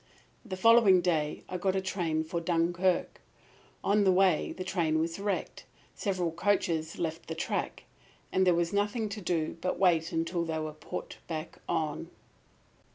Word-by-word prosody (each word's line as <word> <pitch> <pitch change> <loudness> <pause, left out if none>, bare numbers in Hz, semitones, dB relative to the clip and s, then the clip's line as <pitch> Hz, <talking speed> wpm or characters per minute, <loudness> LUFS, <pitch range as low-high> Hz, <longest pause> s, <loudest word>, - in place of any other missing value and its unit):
"The 190 -6 -6
following 225 -2 +6
day 155 -4 0
I 180 - -4
got 190 +1 +1
a - - +2
train 175 -4 -1
for 170 +2 -3
Dunkirk. 175 +2 0 0.6
On 205 +1 +3
the 190 - +5
way 185 -3 +3
the 185 - -5
train 170 -4 0
was 165 +3 -1
wrecked. 200 0 -3 0.3
Several 185 -5 -1
coaches 170 -3 0
left 165 -1 -3
the 160 - -4
track, - - -3 0.5
and 190 - +3
there 180 - +5
was 170 +1 0
nothing 210 +2 0
to 205 +1 -6
do 170 -2 -1
but 185 - 0
to - - -10
wait 170 -4 +3
until 165 +1 -1
they 160 -1 -2
were 155 -1 -4
put 155 - -7
back 160 -1 -5
on. 155 -3 -1
175 Hz, 165 wpm, -30 LUFS, 165-190 Hz, 0.6 s, following